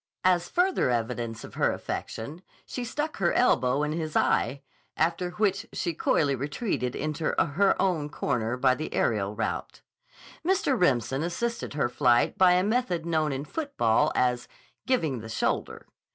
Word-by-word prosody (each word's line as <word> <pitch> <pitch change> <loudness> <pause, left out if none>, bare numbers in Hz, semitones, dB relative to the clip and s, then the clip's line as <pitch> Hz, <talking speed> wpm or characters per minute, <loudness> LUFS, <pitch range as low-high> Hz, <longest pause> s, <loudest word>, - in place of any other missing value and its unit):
As 175 -1 +3
further 360 - +2
evidence 115 -1 -2
of - - -10
her - - +2
affection, 145 +10 -5 0.2
she 250 - -5
stuck 295 +6 -3
her 175 -3 +1
elbow 135 - +3
in 150 - -1
his 155 -1 -3
eye, 140 +1 +1 0.3
after 170 +3 +1
which 195 0 0
she 175 -3 -2
coyly 145 -2 +1
retreated 135 - -2
into 155 +1 -3
her 190 +6 +2
own 165 -6 +1
corner 125 -4 -1
by 130 0 +4
the 155 +5 -5
aerial 105 -2 0
route. 110 - -4 0.6
Mr. 365 -6 +2
Remsen 135 - +1
assisted 205 +2 -3
her 140 - +1
flight 120 0 +2
by 185 -1 +5
a 180 +1 +3
method 205 -6 0
known 160 -3 +1
in 135 +2 -3
football 215 - +1
as 125 -1 +1 0.4
"giving 160 - +1
the 110 0 -9
shoulder." - - -2
155 Hz, 150 wpm, -27 LUFS, 125-190 Hz, 0.6 s, by